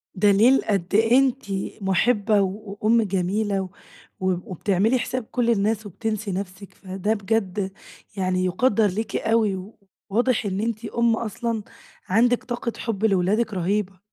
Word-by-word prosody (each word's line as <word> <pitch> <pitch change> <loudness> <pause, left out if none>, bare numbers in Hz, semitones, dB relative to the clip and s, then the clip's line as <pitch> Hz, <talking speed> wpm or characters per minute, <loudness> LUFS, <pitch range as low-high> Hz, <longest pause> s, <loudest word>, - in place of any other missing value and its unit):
دليل 205 +7 +5
قد 195 -4 +1
إيه 225 +3 +5
أنتِ 270 -1 0 0.4
مُحِبّة 205 +2 +2
و 200 +1 -4
وأم 230 +2 +4
جميلة 200 +1 0
و - - -3 0.5
وب 185 -1 -1
وبتعملي 200 +6 +1
حساب 255 +1 -3
كل 245 -2 +1
الناس 215 0 +1
وبتنسي 215 +1 -3
نَفسِك، 190 +1 -6
فده 190 +2 -2
بجد 200 -2 -1 0.5
يعني 185 -1 0
يُقدَّر 210 +3 +2
ليكِ 205 +2 -3
أوي، 215 -3 0 0.4
وواضح 235 +2 +1
إن 190 -1 -2
أنتِ 225 +1 -2
أم 235 0 +1
أصلًا 225 0 -3 0.5
عندِك 235 +5 +3
طاقة 240 -1 -3
حب 220 -2 -2
لولادِك 210 +3 +1
رهيبة. 190 +1 -1
210 Hz, 135 wpm, -23 LUFS, 190-225 Hz, 0.5 s, دليل